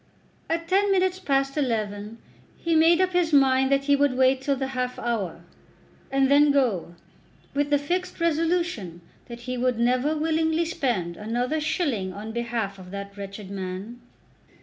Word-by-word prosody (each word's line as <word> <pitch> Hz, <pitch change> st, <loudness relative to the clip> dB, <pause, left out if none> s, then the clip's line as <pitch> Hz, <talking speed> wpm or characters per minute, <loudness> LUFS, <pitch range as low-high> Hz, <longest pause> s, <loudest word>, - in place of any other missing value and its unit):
At 330 Hz, +1 st, -1 dB
ten 395 Hz, +2 st, +3 dB
minutes 375 Hz, -1 st, +2 dB
past 275 Hz, -5 st, 0 dB
eleven 215 Hz, -4 st, -2 dB, 0.4 s
he 335 Hz, -1 st, 0 dB
made 330 Hz, +2 st, +5 dB
up 370 Hz, -1 st, +2 dB
his 355 Hz, -2 st, +1 dB
mind 265 Hz, -2 st, +4 dB
that 275 Hz, 0 st, +3 dB
he 285 Hz, 0 st, +3 dB
would 280 Hz, -2 st, +2 dB
wait 260 Hz, 0 st, +3 dB
till 275 Hz, +1 st, 0 dB
the 265 Hz, 0 st, -3 dB
half 250 Hz, -1 st, -3 dB
hour, 205 Hz, -8 st, -3 dB, 0.7 s
and 270 Hz, 0 st, +2 dB
then 290 Hz, +2 st, +5 dB
go, 235 Hz, -12 st, +1 dB, 0.6 s
with 285 Hz, 0 st, 0 dB
the 290 Hz, -, +4 dB
fixed 360 Hz, +7 st, -3 dB
resolution 330 Hz, -, 0 dB, 0.3 s
that 235 Hz, -1 st, -9 dB
he 255 Hz, +1 st, -4 dB
would 250 Hz, -1 st, +1 dB
never 255 Hz, +6 st, +1 dB
willingly 320 Hz, +1 st, +1 dB
spend 235 Hz, -, -2 dB
another 245 Hz, +8 st, -1 dB
shilling 280 Hz, -, -1 dB
on 210 Hz, +3 st, -7 dB
behalf 230 Hz, -4 st, -3 dB
of 180 Hz, -1 st, -11 dB
that 200 Hz, +1 st, -7 dB
wretched 200 Hz, 0 st, -8 dB
man. 195 Hz, +4 st, -6 dB
265 Hz, 160 wpm, -25 LUFS, 220-315 Hz, 0.7 s, made